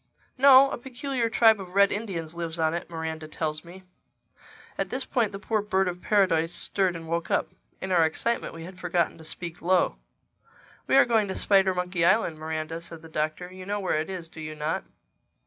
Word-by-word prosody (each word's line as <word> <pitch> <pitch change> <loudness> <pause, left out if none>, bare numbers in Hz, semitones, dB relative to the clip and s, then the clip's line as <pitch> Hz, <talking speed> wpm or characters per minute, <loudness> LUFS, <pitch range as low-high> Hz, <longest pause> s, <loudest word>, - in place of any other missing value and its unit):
"No. 270 0 +7
A - - -4
peculiar 250 -1 -2
tribe 225 -2 +5
of 185 0 -10
Red 200 0 +5
Indians 180 -7 -4
lives 170 -1 -4
on 160 -1 +1
it, 175 +1 -4
Miranda 160 -1 -5
tells 155 0 -3
me." 180 +2 -12 0.9
At - - -2
this 265 +1 -2
point 235 -6 0
the 195 - -6
poor 210 +2 -1
Bird 190 -2 +1
of 180 0 -4
Paradise 170 -6 +2
stirred 185 0 0
and 165 -1 -8
woke 170 0 -2
up. - - +1 0.3
In 190 - -4
our 175 -3 +5
excitement 165 +6 -1
we 165 - -8
had 180 +2 -10
forgotten 175 -2 0
to - - -11
speak 165 +1 -6
low. 175 - +2 0.9
"We - - +3
are 275 - +7
going 225 -3 +2
to 190 - -4
Spidermonkey 185 -3 +2
Island, 170 -4 +3
Miranda," 160 +1 -4
said 165 -1 -11
the 165 - -11
Doctor. 155 +4 -3
"You 185 0 -10
know 205 0 -1
where 185 -5 0
it 160 - -6
is, 180 -3 -6
do 160 - -11
you 155 0 -6
not?" 155 +1 -2
180 Hz, 200 wpm, -26 LUFS, 160-200 Hz, 0.9 s, No